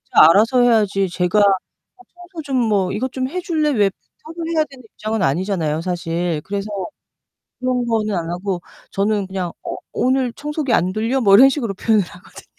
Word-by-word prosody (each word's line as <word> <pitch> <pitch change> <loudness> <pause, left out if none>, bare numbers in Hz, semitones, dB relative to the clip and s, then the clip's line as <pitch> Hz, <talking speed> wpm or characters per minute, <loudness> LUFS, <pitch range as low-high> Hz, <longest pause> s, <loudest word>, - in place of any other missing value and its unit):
각자 160 - +9
알아서 225 +7 +4
해야지 210 -5 +3
제가 180 +3 +1
"어, 200 - -1
청소 355 -1 -9
좀 270 -2 -2
뭐 195 -3 +1
이것 250 +5 -2
좀 260 0 -3
해줄래?" 335 -3 -1
왜 205 -6 +3
부탁을 325 - -11
해야 310 - +4
되는 265 -2 -14
입장은 215 -1 -3
아니잖아요, 160 0 0
사실. 170 -2 -2
그래서 200 +1 -4 0.9
그런 250 -1 0
거는 220 -2 0
안 165 -1 -3
하고 180 +1 -3 0.3
저는 200 0 0
그냥 185 -3 -4
"어, - - -4 0.2
오늘 255 -1 +1
청소기 295 -3 -3
안 180 +2 +2
돌려?" 230 +6 -1
뭐 200 -3 +6
이런 260 +5 +9
식으로 240 -8 -2
표현을 215 +1 +2
하거든요. 180 0 -14
210 Hz, 360 characters per minute, -20 LUFS, 185-260 Hz, 0.9 s, 각자